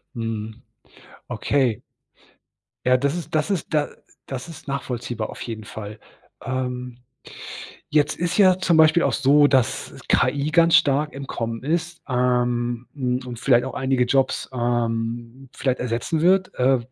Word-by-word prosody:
Mhm. 115 Hz, -1 st, -5 dB, 0.7 s
Okay. 130 Hz, -7 st, 0 dB, 1.0 s
Ja, 125 Hz, 0 st, +5 dB
das 140 Hz, +4 st, 0 dB
ist 175 Hz, -2 st, -5 dB
das 155 Hz, +6 st, +1 dB
ist 185 Hz, -4 st, -3 dB
da 150 Hz, -1 st, +2 dB, 0.4 s
das 130 Hz, -1 st, -6 dB
ist 165 Hz, -3 st, -11 dB
nachvollziehbar 120 Hz, -5 st, -3 dB
auf -, -, -9 dB
jeden 110 Hz, -2 st, -6 dB
Fall. 105 Hz, 0 st, -8 dB, 0.4 s
Ähm, 125 Hz, -1 st, -3 dB, 0.9 s
jetzt 150 Hz, -1 st, +2 dB
ist 175 Hz, +2 st, -1 dB
ja 185 Hz, -3 st, +6 dB
zum 180 Hz, -3 st, +2 dB
Beispiel 160 Hz, +2 st, +6 dB
auch -, -, +2 dB
so, 145 Hz, +2 st, +5 dB
dass 130 Hz, -5 st, +1 dB
KI 145 Hz, +1 st, +2 dB
ganz 170 Hz, 0 st, +5 dB
stark 145 Hz, +2 st, +2 dB
im 135 Hz, 0 st, -7 dB
Kommen 115 Hz, -2 st, -4 dB
ist, 170 Hz, +3 st, -2 dB
ähm, 125 Hz, -1 st, 0 dB
hm, 125 Hz, -3 st, -1 dB
und 120 Hz, -2 st, -7 dB
vielleicht 120 Hz, -1 st, +3 dB
auch 130 Hz, -, -5 dB
einige 130 Hz, -1 st, +1 dB
Jobs, 135 Hz, +2 st, +1 dB
ähm, 120 Hz, +1 st, -2 dB
vielleicht 130 Hz, -2 st, -1 dB
ersetzen 125 Hz, +6 st, -1 dB
wird. 185 Hz, +2 st, +3 dB
Äh, 130 Hz, +1 st, +3 dB
130 Hz, 145 wpm, -23 LUFS, 120-150 Hz, 1.0 s, ja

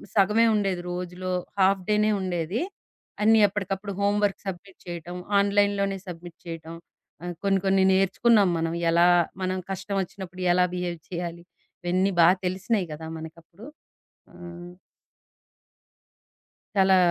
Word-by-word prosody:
సగమే 210 Hz, +3 st, +4 dB
ఉండేది. 195 Hz, -4 st, 0 dB
రోజులో 180 Hz, +1 st, -4 dB, 0.3 s
హాఫ్ 190 Hz, 0 st, +4 dB
డేనే 210 Hz, 0 st, +3 dB
ఉండేది. 180 Hz, -, -2 dB, 0.6 s
అన్నీ 225 Hz, +1 st, +6 dB
ఎప్పటికప్పుడు 195 Hz, 0 st, -4 dB
హోమ్‌వర్క్స్ 205 Hz, 0 st, +1 dB
సబ్మిట్ 190 Hz, +1 st, -7 dB
చేయటం, 175 Hz, +1 st, -6 dB, 0.2 s
ఆన్‌లైన్‌లోనే 200 Hz, -1 st, +2 dB
సబ్మిట్ 175 Hz, -1 st, -9 dB
చేయటం. 165 Hz, 0 st, -7 dB, 0.5 s
ఆహ్, 175 Hz, -1 st, -5 dB
కొన్ని, 195 Hz, -1 st, +3 dB
కొన్ని 190 Hz, 0 st, +4 dB
నేర్చుకున్నాం 195 Hz, +2 st, +4 dB
మనం 165 Hz, 0 st, -1 dB, 0.2 s
ఎలా 170 Hz, +1 st, +5 dB, 0.4 s
మనం 185 Hz, 0 st, -1 dB
కష్టమోచ్చినప్పుడు 190 Hz, -1 st, -4 dB
ఎలా 180 Hz, 0 st, +4 dB
బిహేవ్ 175 Hz, -2 st, -3 dB
చేయాలి, 170 Hz, -1 st, -5 dB, 0.4 s
ఇవన్నీ 185 Hz, +3 st, +1 dB
బాగా 180 Hz, +3 st, +6 dB
తెలిసినయి 190 Hz, +1 st, -1 dB
కదా 160 Hz, +1 st, -8 dB
మనకప్పుడు. 165 Hz, +5 st, -12 dB, 0.7 s
ఆ! -, -, -16 dB, 2.4 s
చాలా 190 Hz, -1 st, +5 dB
185 Hz, 110 wpm, -26 LUFS, 175-200 Hz, 2.4 s, అన్నీ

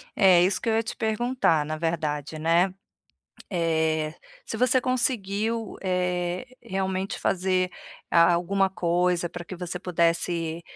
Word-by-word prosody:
É, 185 Hz, -4 st, +6 dB
isso 185 Hz, +1 st, +1 dB
que 230 Hz, -, -1 dB
eu 220 Hz, -, +2 dB
ia 225 Hz, -, +2 dB
te 225 Hz, -, -5 dB
perguntar 220 Hz, -8 st, +1 dB
na 155 Hz, +1 st, -4 dB
verdade, 155 Hz, -2 st, -2 dB
né, 170 Hz, +4 st, +3 dB, 0.8 s
eh, 160 Hz, -3 st, 0 dB, 0.3 s
se 220 Hz, -, -5 dB
você 255 Hz, +2 st, +3 dB
conseguiu, 225 Hz, -3 st, -1 dB
eh, 180 Hz, 0 st, -1 dB, 0.2 s
realmente 190 Hz, -2 st, -2 dB
fazer 185 Hz, -1 st, +1 dB, 0.4 s
a 170 Hz, +1 st, +6 dB
alguma 190 Hz, +3 st, +1 dB
coisa 175 Hz, -1 st, 0 dB
pra 175 Hz, 0 st, -8 dB
que 185 Hz, -, -7 dB
você 180 Hz, 0 st, -5 dB
pudesse 170 Hz, -1 st, 0 dB
180 Hz, 135 wpm, -26 LUFS, 170-200 Hz, 0.8 s, É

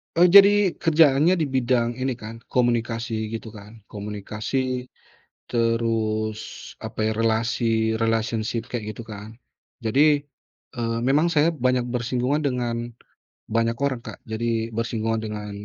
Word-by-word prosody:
Eee, 175 Hz, +2 st, +6 dB
jadi 200 Hz, 0 st, +7 dB
kerjaannya 155 Hz, 0 st, +4 dB
di 150 Hz, -, 0 dB
bidang 120 Hz, -2 st, +1 dB
ini 130 Hz, 0 st, -1 dB
kan 115 Hz, -1 st, -9 dB
komunikasi 115 Hz, -2 st, -1 dB
gitu 115 Hz, 0 st, -5 dB
kan. 105 Hz, +1 st, -13 dB
Komunikasi, 110 Hz, +5 st, -3 dB, 0.6 s
terus 115 Hz, -2 st, -1 dB
apa 110 Hz, -, -3 dB
ya? 110 Hz, -, +1 dB
Relasi, 115 Hz, 0 st, +1 dB
relationship 115 Hz, 0 st, 0 dB
kek 120 Hz, -1 st, -4 dB
gitu 110 Hz, +2 st, -7 dB
kan. 110 Hz, +1 st, -9 dB, 0.5 s
Jadi, 145 Hz, +5 st, +3 dB, 0.5 s
eee, 115 Hz, -3 st, -2 dB
memang 150 Hz, +6 st, +3 dB
saya 165 Hz, 0 st, +3 dB
banyak 125 Hz, -3 st, +1 dB
bersinggungan 125 Hz, +4 st, -1 dB
dengan 125 Hz, -4 st, -1 dB, 0.8 s
banyak 115 Hz, +1 st, +1 dB
orang, 135 Hz, -1 st, -1 dB
Kak. -, -, -11 dB
Jadi 115 Hz, 0 st, -2 dB
bersinggungan 115 Hz, 0 st, -1 dB
dengan 105 Hz, -1 st, -5 dB
115 Hz, 125 wpm, -24 LUFS, 110-130 Hz, 0.8 s, jadi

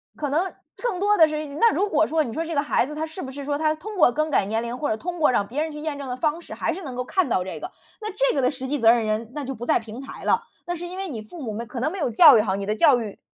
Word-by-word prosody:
可 290 Hz, -, -3 dB
能 335 Hz, +7 st, 0 dB, 0.2 s
更 475 Hz, -6 st, -2 dB
多 415 Hz, +1 st, +3 dB
的 320 Hz, -, +7 dB
是 305 Hz, 0 st, -3 dB
那 300 Hz, +11 st, +2 dB
如 400 Hz, +6 st, +1 dB
果 315 Hz, -1 st, +3 dB
说， 315 Hz, 0 st, +1 dB
你 235 Hz, -6 st, -6 dB
说 325 Hz, +6 st, -2 dB
这 330 Hz, 0 st, -4 dB
个 285 Hz, -, +3 dB
孩 290 Hz, -, +1 dB
子 300 Hz, +3 st, -7 dB
他 310 Hz, +1 st, -2 dB
是 320 Hz, +4 st, -8 dB
不 265 Hz, -, -6 dB
是 280 Hz, +2 st, -7 dB
说 285 Hz, +1 st, -1 dB
他 310 Hz, 0 st, +1 dB
通 415 Hz, +7 st, -8 dB
过 300 Hz, -8 st, +5 dB
更 310 Hz, +1 st, 0 dB
改 200 Hz, -, +3 dB
年 220 Hz, +3 st, -1 dB
龄 235 Hz, +1 st, -4 dB
或 295 Hz, -, -2 dB
者 -, -, +1 dB
通 345 Hz, +9 st, -5 dB
过 300 Hz, -, +4 dB
让 205 Hz, -, +2 dB
别 260 Hz, +8 st, -3 dB
人 315 Hz, 0 st, -3 dB
去 300 Hz, -, -7 dB
验 300 Hz, -1 st, -4 dB
证 280 Hz, -, -6 dB
的 250 Hz, -, -3 dB
方 305 Hz, +5 st, -1 dB
式， -, -, -10 dB
还 -, -, -1 dB
是 380 Hz, -, -7 dB
能 265 Hz, -5 st, -6 dB
够 250 Hz, -, -2 dB
看 370 Hz, +6 st, +1 dB
到 185 Hz, -7 st, +1 dB
这 185 Hz, -, -6 dB
个， 360 Hz, -, -7 dB, 0.3 s
那 430 Hz, -, -4 dB
这 -, -, +1 dB
个 275 Hz, -, +1 dB
的 255 Hz, -, +3 dB
实 260 Hz, -2 st, -5 dB
际 295 Hz, +1 st, -1 dB
责 225 Hz, -1 st, +7 dB
任 235 Hz, -2 st, +1 dB
人， 215 Hz, +2 st, -2 dB
那 295 Hz, -, -3 dB
就 270 Hz, 0 st, -4 dB
不 240 Hz, -1 st, -7 dB
在 -, -, +3 dB
平 225 Hz, +1 st, -8 dB
台 270 Hz, -, -9 dB
了， -, -, +2 dB, 0.2 s
那 350 Hz, -, -2 dB
是 350 Hz, +1 st, -6 dB
因 365 Hz, +2 st, -8 dB
为 385 Hz, -1 st, -4 dB
你 230 Hz, -7 st, -5 dB
父 260 Hz, +10 st, -11 dB
母 225 Hz, -, -3 dB
们 230 Hz, +3 st, -5 dB
可 235 Hz, +2 st, -6 dB
能 310 Hz, -, 0 dB
没 390 Hz, -, -6 dB
有 295 Hz, -, 0 dB
教 275 Hz, +3 st, +8 dB
育 -, -, +5 dB
好， 195 Hz, -3 st, -1 dB
你 200 Hz, 0 st, -4 dB
的 210 Hz, +1 st, -1 dB
教 245 Hz, +2 st, +5 dB
育， 210 Hz, -3 st, -7 dB
290 Hz, 380 characters per minute, -24 LUFS, 240-325 Hz, 0.3 s, 教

